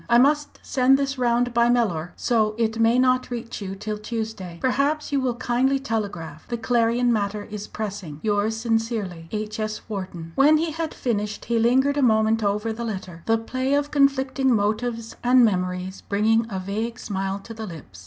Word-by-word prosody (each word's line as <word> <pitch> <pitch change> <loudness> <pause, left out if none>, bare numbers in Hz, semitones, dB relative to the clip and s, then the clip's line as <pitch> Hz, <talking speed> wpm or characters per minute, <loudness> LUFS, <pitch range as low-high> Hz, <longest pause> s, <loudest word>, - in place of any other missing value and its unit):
"I 235 - +6
must 290 +3 +3
send 265 +1 +4
this 275 -1 -2
round 245 0 +2
by 235 0 +4
Mellor, 185 -9 +1
so 215 -3 +1
it 225 -1 0
may 230 +2 +4
not 255 0 +3
reach 235 -2 -5
you 195 -1 -5
till 210 +1 -4
Tuesday. 215 -5 -5
Perhaps 285 +4 0
you 280 - +2
will 255 -2 0
kindly 255 +2 +1
telegraph. 210 -10 -4
The 240 - -2
Clarion 235 +1 +2
matter 205 -1 -1
is 210 -1 -5
pressing. 195 -8 -6
"Yours 215 +1 +1
sincerely, 225 -7 -2
"H.S. 215 0 -3
WHARTON." 185 -5 -6
When 295 +3 +5
he 325 +1 -1
had 320 0 -4
finished 210 -4 -2
he 235 -1 +1
lingered 265 +5 +3
a - - +2
moment 220 -2 +3
over 210 +2 0
the 235 +2 -5
letter, 185 -6 -5
the 225 0 +4
play 260 +4 -1
of 290 0 0
conflicting 270 -2 +2
motives 225 +2 -1
and 250 0 +6
memories 185 -2 -2
bringing 220 +3 +2
a 195 - -3
vague 220 +5 -3
smile 195 -3 -3
to 200 +3 -10
the 220 -1 -6
lips. 150 - -10
225 Hz, 180 wpm, -24 LUFS, 205-250 Hz, -, I